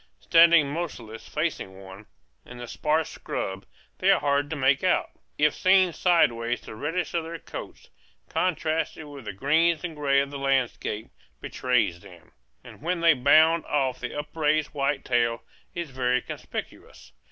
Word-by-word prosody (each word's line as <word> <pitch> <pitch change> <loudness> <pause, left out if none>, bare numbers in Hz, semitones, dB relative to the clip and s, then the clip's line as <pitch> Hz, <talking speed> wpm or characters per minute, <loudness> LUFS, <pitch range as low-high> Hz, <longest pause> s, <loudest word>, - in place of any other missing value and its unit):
Standing 165 - +5
motionless 120 -10 -6
facing 150 - -3
one, 95 +2 -12 0.4
in 125 - -12
the 120 0 -8
sparse 155 +5 0
scrub, 95 -3 -5 0.3
they - - +2
are - - +5
hard 145 0 0
to 160 - -3
make 135 -1 +2
out; - - +1 0.3
if 150 0 +3
seen 185 -2 +3
sideways 120 -11 +2
the - - -10
reddish 160 +10 -3
of 170 -1 0
their 165 +1 -6
coats, - - -10 0.4
contrasted 160 -2 -1
with 140 -4 -11
the 105 - -4
greens 155 - +1
and 170 -3 -5
grays 140 -2 +2
of 140 - -9
the 140 - -6
landscape, 130 -5 -1 0.3
betrays 115 -9 0
them; 85 -1 -16 0.3
and - - -14
when 170 +2 -2
they 165 -1 +6
bound 155 +5 +4
off 135 -3 0
the - - -5
upraised 155 0 0
white 140 -1 -2
tail 120 -1 +1 0.3
is 170 -4 -5
very 125 -1 +1
conspicuous. - - -8
145 Hz, 155 wpm, -26 LUFS, 125-160 Hz, 0.4 s, they